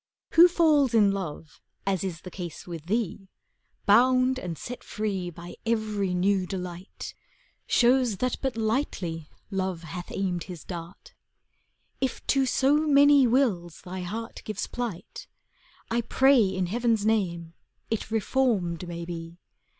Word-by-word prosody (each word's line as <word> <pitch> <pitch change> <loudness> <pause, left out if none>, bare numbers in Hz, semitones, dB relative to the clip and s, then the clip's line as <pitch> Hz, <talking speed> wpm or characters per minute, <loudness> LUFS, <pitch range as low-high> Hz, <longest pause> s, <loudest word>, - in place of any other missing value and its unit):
Who 340 +2 +9
falls 300 -8 +3
in 205 -3 +5
love, 165 -5 -6 0.2
as 195 -2 0
is 180 -3 -4
the 180 - -9
case 175 -4 -7
with 165 -2 -8
thee. 200 -2 -2 0.6
Bound 255 +4 +4
and 170 -6 -5
set 245 0 -7
free 195 -4 -3
by 175 +1 -10
every 215 -5 0
new 190 0 +2
delight, 180 -1 -6 0.3
" - - -33 0.2
Shows 245 -3 +3
that 250 +3 0
but 265 -4 -2
lightly 215 - -2 0.2
Love 190 -3 -2
hath 175 +2 -7
aimed 180 -3 -2
his 175 -4 -8
dart. 170 +1 -9 0.9
If 265 - -2
to 270 -1 +2
so 270 +3 +3
many 285 -2 +6
wills 215 - +1
thy 185 +1 -6
heart 225 +6 -6
gives 215 - -3
plight, 235 -8 -6 0.6
I 235 +1 +2
pray 260 0 +4
in 190 -1 -1
Heaven's 225 +2 +1
name, 170 -7 0 0.4
it 225 - -2
reformed 210 -6 0
may 170 0 -5
be. 165 0 -7
200 Hz, 140 wpm, -27 LUFS, 175-245 Hz, 0.9 s, Who